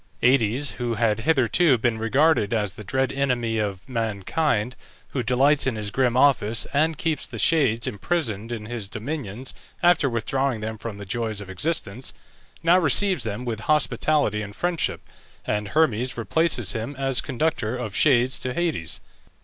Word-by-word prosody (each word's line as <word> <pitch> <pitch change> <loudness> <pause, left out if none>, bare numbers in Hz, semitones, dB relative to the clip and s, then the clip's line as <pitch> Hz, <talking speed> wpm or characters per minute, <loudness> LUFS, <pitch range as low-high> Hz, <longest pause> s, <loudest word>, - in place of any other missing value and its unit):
Aïdes, 125 +2 +3
who 120 -2 -2
had 110 -2 +1
hitherto 140 +2 +3
been 115 -1 0
regarded 120 -1 +2
as 105 -3 -1
the 105 - -10
dread 130 +7 0
enemy 120 -5 0
of 100 0 -3
mankind, 115 - -1 0.4
who 130 - 0
delights 135 +4 +3
in 130 - 0
his 105 -1 -3
grim 125 -1 +1
office, 115 -5 +3
and 155 +2 +2
keeps 160 -1 -2
the - - -8
shades 130 -9 +3
imprisoned 115 - -2
in 110 -3 -5
his 110 -3 -6
dominions 125 0 -5 0.3
after 175 -5 +4
withdrawing 130 +1 -1
them 110 0 -5
from 110 -2 -6
the 100 - -8
joys 110 0 -3
of 95 -2 -8
existence, 125 - -3 0.5
now 170 +2 +5
receives 185 - +3
them 110 +3 -4
with 115 -3 -3
hospitality 150 -6 +2
and 100 -1 -7
friendship, 175 -1 -1 0.4
and 105 0 -1
Hermes 125 -3 +1
replaces 120 - +1
him 115 +6 -4
as 135 -1 +1
conductor 130 -4 -1
of 110 -5 -5
shades 130 -3 +3
to 125 -1 -3
Hades. 165 - -2
120 Hz, 155 wpm, -24 LUFS, 110-145 Hz, 0.5 s, now